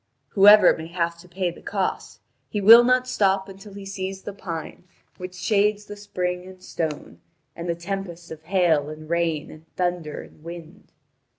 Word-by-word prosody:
Whoever 205 +2 +7
may 160 0 -8
have 170 0 -2
to 180 - -15
pay 180 0 -2
the - - -14
cost, 195 -2 -3 0.3
he 205 - -2
will 225 +4 +9
not 255 +1 +2
stop 195 -5 +1
until 195 +1 -12
he 200 -1 -9
sees 190 0 -5
the 205 - -6
pine 170 -3 -7 0.3
which 185 0 -8
shades 205 +3 +1
the 205 - -9
spring 180 -3 -3
and 185 -1 -14
stone, 155 -3 -5 0.3
and 170 +1 -6
the 170 - 0
tempest 175 -1 -6
of 160 -1 -8
hail 160 -4 +1
and 155 0 -9
rain 165 -3 -1
and 155 +1 -15
thunder 175 -4 -2
and 150 - -18
wind. 170 +3 -11
180 Hz, 175 wpm, -24 LUFS, 170-195 Hz, 0.3 s, will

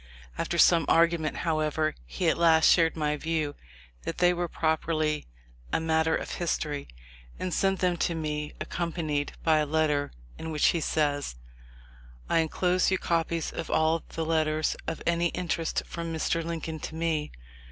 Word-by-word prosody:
After - - -2
some 170 -2 +6
argument, 165 -2 +3
however, 155 -1 +1
he - - -2
at - - +4
last 160 -2 +5
shared 165 -2 +4
my 150 -2 0
view 155 -1 -1 0.5
that - - -5
they 180 0 +4
were 175 0 -2
properly 155 -1 0 0.4
a - - +2
matter 160 0 +2
of - - -4
history, 150 -4 -2 0.5
and 185 -1 -2
sent 195 -1 +1
them 180 -1 +2
to 170 +1 0
me, 150 -2 -3
accom 170 -1 -3
panied 150 -4 -1
by 160 -1 +4
a 150 - +1
letter, 150 -2 +1 0.3
in 160 - -5
which 155 -2 +3
he 170 - +1
says: 145 - 0 0.9
"I 165 - +3
enclose 180 +3 +2
you 190 - +2
copies 165 -2 -1
of - - -5
all 160 +1 +2
the 165 - -3
letters 155 -1 +1
of 165 - -4
any 170 0 +2
interest 170 -1 -2
from 170 -1 -5
Mr. 165 +1 0
Lincoln 160 -1 -4
to 160 - -6
me. 160 -2 -1
160 Hz, 165 wpm, -28 LUFS, 155-170 Hz, 0.9 s, some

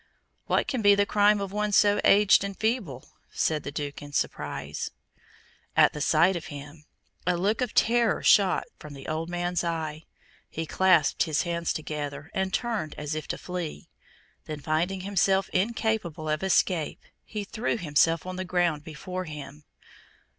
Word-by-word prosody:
"What - - +1
can 255 - -1
be 205 -1 +6
the 200 0 +3
crime 205 0 +4
of 200 -1 -4
one 210 +1 -1
so 205 0 +4
aged 200 -1 +6
and 200 -1 -5
feeble?" 220 - -2 0.2
said 155 -2 0
the 140 - -6
Duke, 145 -1 -5
in 145 0 -10
surprise. - - -3 0.9
At - - +6
the 150 - -5
sight 170 +5 +4
of 170 - -5
him, 145 +1 -10 0.4
a 180 -1 +2
look 205 +7 0
of 250 -4 -2
terror 235 -1 +3
shot 195 -3 +5 0.2
from 150 -2 -10
the 135 - -10
old 160 +1 -3
man's 175 0 -1
eye. 160 -2 -3 0.4
He 165 - -4
clasped 175 -2 +3
his 155 -3 0
hands 170 -1 -1
together, 150 0 -5
and 190 0 -1
turned 220 -11 -2
as 150 0 -4
if 155 -1 -4
to - - -3
flee; 180 -4 -6 0.6
then, 155 -1 -6
finding 165 +6 -1
himself 195 0 +1
incapable 200 -6 -1
of 155 0 0
escape, 185 -3 +1 0.2
he 210 -2 -5
threw 220 +4 -2
himself 165 -1 +2
on 185 0 -5
the 185 - -2
ground 175 -4 0
before 180 +4 -6
him. 150 -1 -9
175 Hz, 165 wpm, -27 LUFS, 155-200 Hz, 0.9 s, be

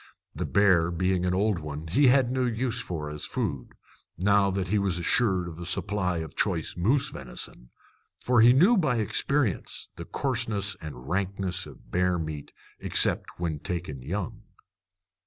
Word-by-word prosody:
The - - -3
bear 95 -5 +4
being 90 +1 0
an 90 - +1
old 100 -1 +1
one, 75 0 -6
he 130 - +3
had 125 -1 +4
no 130 0 0
use 120 0 -1
for 80 -4 -4
it 75 - -5
as 75 - -4
food, 65 -3 -3 0.4
now 100 +2 +3
that 95 -1 -2
he 105 +1 +2
was 95 -3 0
assured 95 0 +1
of 85 -1 -8
a 85 - -6
supply 95 -2 -1
of 80 -1 -6
choice 85 -6 -1
moose 130 +11 +2
venison; - - -7 0.5
for 125 -2 +3
he 120 +2 +8
knew 180 - +5
by 155 -9 +2
experience 115 - 0
the - - -7
coarseness 110 -7 -1
and 70 -5 -9
rankness 95 0 -1
of - - -15
bear 90 0 +2
meat, 80 -3 -5 0.3
except - - +1
when 80 -4 -2
taken 80 -6 -5
young. 90 +7 -4
95 Hz, 165 wpm, -27 LUFS, 85-110 Hz, 0.5 s, he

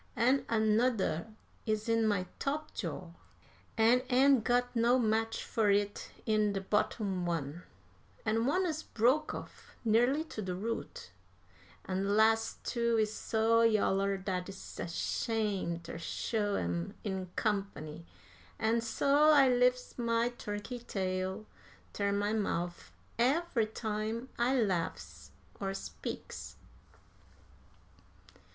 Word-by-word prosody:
An' 255 +4 +2
anudder 220 -5 +2 0.4
is 215 0 0
in 230 -1 +3
my 200 -4 +1
top 305 +2 -2
jaw, 175 -2 -5 0.7
an' 230 +3 +5
ain't 265 -1 +5
got 245 +1 +1
no 235 +2 +4
match 225 -1 0
fur 220 -3 +1
it 205 0 +1 0.2
in 215 -2 +2
de 195 - -2
bottom 195 -1 0
one; 165 -1 -3 0.6
an' 225 +2 +1
one 370 +7 +2
is 315 -2 -2
broke 260 +7 +1
off - - -10
nearly 245 +7 +3
to 315 -9 -7
de 185 -3 -3
root; 205 - -5 0.7
an' 190 0 -1
de 195 - -1
las' 225 +2 +3
two 235 -1 +1
is 215 -1 +1
so 225 +1 +2
yaller 200 -3 +3
dat 185 -1 -3
I's 195 0 -9
ashamed 190 -1 -1
ter 165 0 -7
show 205 +3 -1
'em 85 0 -2
in 190 -3 -3
company, 195 -7 -2 0.5
an' 225 +1 +1
so 280 +6 +3
I 280 -4 +7
lif's 250 0 +2
my 230 0 +2
turkey 240 +1 -6
tail 190 -1 -3 0.5
ter 200 -1 0
my 205 +1 0
mouf 175 -5 -2 0.3
every 265 -2 +2
time 220 +3 -3
I 255 +2 +3
laughs 185 -7 -2 0.3
or 195 -1 -2
speaks." - - -7
220 Hz, 120 wpm, -32 LUFS, 195-240 Hz, 0.7 s, I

